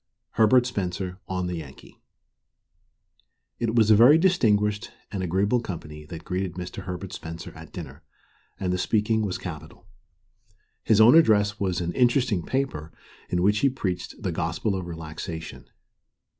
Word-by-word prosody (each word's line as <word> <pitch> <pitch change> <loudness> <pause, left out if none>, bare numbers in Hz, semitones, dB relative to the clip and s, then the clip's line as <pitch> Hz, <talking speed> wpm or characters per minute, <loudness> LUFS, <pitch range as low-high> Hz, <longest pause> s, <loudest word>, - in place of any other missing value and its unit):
HERBERT 120 +3 +4
SPENCER 95 -4 -3
ON 95 -1 -2
THE 90 -1 -3
YANKEE 70 -5 -12 1.6
It 115 -1 -1
was 110 -2 +5
a - - +8
very 125 +8 +7
distinguished 105 - +2 0.2
and 100 - -3
agreeable 95 +7 +1
company 75 -8 -7
that 85 -1 -8
greeted 90 -1 -2
Mr. 90 0 -7
Herbert 90 +1 -6
Spencer 85 +1 -8
at - - -12
dinner, - - -9 0.6
and 90 -1 -1
the 90 - -1
speaking 110 +3 +1
was 100 -4 -2
capital. 80 -5 -9 1.0
His 110 - +3
own 110 +3 +8
address 105 -9 +4
was 90 -3 -1
an 85 0 -2
interesting 120 -5 +2
paper, 130 - -2 0.4
in 90 0 0
which 105 +2 +3
he 140 - +3
preached 95 -9 -4
"the 95 -4 -2
gospel 85 +5 -1
of 95 -2 -4
relaxation." 80 0 -7
95 Hz, 145 wpm, -25 LUFS, 90-110 Hz, 1.6 s, a